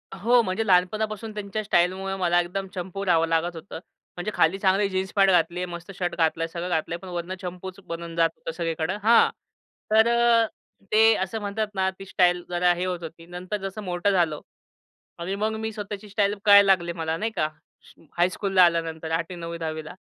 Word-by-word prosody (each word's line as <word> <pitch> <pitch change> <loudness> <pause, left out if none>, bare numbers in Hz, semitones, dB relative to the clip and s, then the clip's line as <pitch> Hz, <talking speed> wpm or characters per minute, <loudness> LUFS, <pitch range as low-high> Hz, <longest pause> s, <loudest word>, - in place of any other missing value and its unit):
हो. 235 +5 +4
म्हणजे 195 +2 -2
लहानपणापासून 215 +4 +1
त्यांच्या 210 0 -4
स्टाईलमुळे 190 0 +1
मला 175 -2 +2
एकदम 190 +3 -4
चंपू 190 +2 -5
राहावं 165 -2 +3
लागत 165 +1 0
होतं. 165 +1 -8 0.4
म्हणजे 175 +4 -3
खाली 165 +4 +3
चांगली 195 +1 +2
जीन्स 190 0 -2
पॅट 195 -1 +4
घातली 175 -1 +2
आहे, 180 - -1
मस्त 175 +2 -8
शर्ट 175 -1 -2
घातला, 165 0 +1
सगळं 170 +2 -5
घातलंय 165 0 -1
पण 185 - -12
वरनं 175 +1 -4
चंपूच 185 +1 -7
बनून 170 0 -6
जात 165 0 +3
होतं - - -6
सगळीकडं 165 +2 -2
हां. 230 +1 +6 0.6
तर 220 +1 +5 0.8
ते 220 +1 +6
असं 195 +4 -4
म्हणतात 205 +1 -2
ना 190 0 +1
ती 195 - -8
स्टाईल 180 -2 +2
जरा 175 0 +2
हे 180 +1 -3
होत 180 -2 -3
होती. 165 +1 -9
नंतर 180 +4 -5
जसं 210 +2 -7
मोठं 180 +1 0
झालो 170 -6 +1 0.8
आणि 185 +3 -3
मग 215 +2 -1
मी 220 0 -3
स्वतःची 210 -1 -7
स्टाईल 205 0 +1
कळायला 200 0 +8
लागली 175 -2 +1
मला 165 -1 -2
नाही 220 +6 -2
का 155 - +1 0.7
हायस्कूलला 185 +1 +3
आल्यानंतर 165 -2 0
8वी-9वी-10वी 165 -2 -4
ला. - - -8
180 Hz, 180 wpm, -25 LUFS, 170-200 Hz, 0.8 s, कळायला